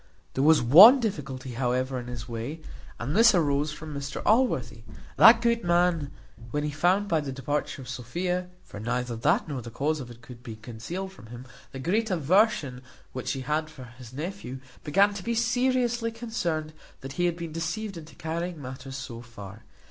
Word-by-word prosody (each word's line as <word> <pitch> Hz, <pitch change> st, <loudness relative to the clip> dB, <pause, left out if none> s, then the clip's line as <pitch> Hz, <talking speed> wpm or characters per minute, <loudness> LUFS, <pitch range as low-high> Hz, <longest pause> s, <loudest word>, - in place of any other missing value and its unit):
There 135 Hz, -, 0 dB
was 155 Hz, -3 st, +5 dB
one 195 Hz, -, +10 dB
difficulty, 135 Hz, -, -4 dB
however, 125 Hz, +1 st, -1 dB
in 120 Hz, -, -8 dB
his 120 Hz, -1 st, -7 dB
way, 120 Hz, +7 st, -5 dB, 0.4 s
and 135 Hz, +7 st, -3 dB
this 230 Hz, -1 st, +6 dB
arose 150 Hz, -2 st, +1 dB
from 155 Hz, 0 st, -8 dB
Mr 140 Hz, 0 st, -5 dB
Allworthy. 245 Hz, +5 st, +2 dB, 0.4 s
That 230 Hz, -, +8 dB
good 235 Hz, -1 st, +2 dB
man, 175 Hz, -4 st, +2 dB, 0.4 s
when 145 Hz, +5 st, -2 dB
he 150 Hz, -, -2 dB
found 180 Hz, +7 st, +2 dB
by 165 Hz, -5 st, +1 dB
the 140 Hz, -2 st, -5 dB
departure 135 Hz, +1 st, -3 dB
of -, -, -12 dB
Sophia 175 Hz, +9 st, -3 dB
(for 100 Hz, -, -10 dB
neither 120 Hz, +2 st, -2 dB
that, 145 Hz, +10 st, +1 dB
nor 140 Hz, -4 st, -4 dB
the 120 Hz, -, -8 dB
cause 150 Hz, +6 st, -1 dB
of 125 Hz, -3 st, -7 dB
it, 120 Hz, 0 st, -13 dB
could 120 Hz, -2 st, -12 dB
be 115 Hz, -2 st, -8 dB
concealed 120 Hz, -, -6 dB
from 145 Hz, -, -14 dB
him), 120 Hz, +2 st, -10 dB, 0.3 s
the 135 Hz, -, -8 dB
great 205 Hz, -, 0 dB
aversion 165 Hz, -, +2 dB, 0.3 s
which 130 Hz, -, -6 dB
she 135 Hz, -, -2 dB
had 155 Hz, +4 st, -1 dB
for 135 Hz, -4 st, -11 dB, 0.2 s
his 120 Hz, -2 st, -11 dB
nephew, 150 Hz, -3 st, -6 dB, 0.2 s
began 195 Hz, +7 st, +3 dB
to 200 Hz, -2 st, -7 dB
be 235 Hz, +3 st, -1 dB
seriously 240 Hz, 0 st, +1 dB
concerned 175 Hz, -10 st, -3 dB, 0.3 s
that 135 Hz, +1 st, -7 dB
he 175 Hz, +4 st, 0 dB
had 170 Hz, -1 st, -2 dB
been 170 Hz, -2 st, -6 dB
deceived 175 Hz, +6 st, -4 dB
into 160 Hz, -3 st, -11 dB
carrying 170 Hz, +1 st, -4 dB
matters 130 Hz, 0 st, -7 dB
so 120 Hz, -4 st, -7 dB
far. 105 Hz, -3 st, -11 dB
150 Hz, 185 wpm, -27 LUFS, 125-180 Hz, 0.4 s, one